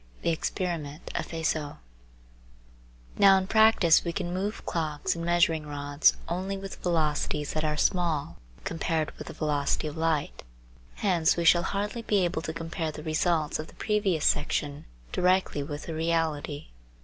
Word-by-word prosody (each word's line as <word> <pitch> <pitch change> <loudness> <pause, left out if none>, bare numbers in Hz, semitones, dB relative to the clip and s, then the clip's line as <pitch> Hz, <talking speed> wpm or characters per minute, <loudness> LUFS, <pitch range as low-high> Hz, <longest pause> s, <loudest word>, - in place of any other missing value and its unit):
THE 170 - +2
EXPERIMENT 165 -2 -3
OF - - -2
FIZEAU 160 -3 -2 1.4
Now 195 -1 +8
in 190 - 0
practice 220 -5 +5
we 170 - -2
can 175 0 -3
move 200 +4 -3
clocks 155 -3 -1
and 170 - -5
measuring 170 -3 +2
rods 145 0 +2
only 190 +3 -2
with 195 0 -7
velocities 150 -3 0
that 155 - -1
are 150 -1 0
small 155 - 0 0.3
compared 165 -1 -1
with - - -7
the - - -7
velocity 150 -1 0
of 150 - -6
light; 160 -2 -1 0.5
hence 175 -6 +2
we 170 - 0
shall 170 +1 +6
hardly 205 +5 -2
be 205 -4 +2
able 170 -2 -2
to 160 - -4
compare 165 0 -4
the 150 - -9
results 155 -1 0
of 155 - -5
the - - -16
previous 205 -7 0
section 145 0 0 0.3
directly 180 -4 +2
with 145 +1 -5
the 165 - -6
reality. 160 - -1
165 Hz, 155 wpm, -28 LUFS, 150-180 Hz, 1.4 s, Now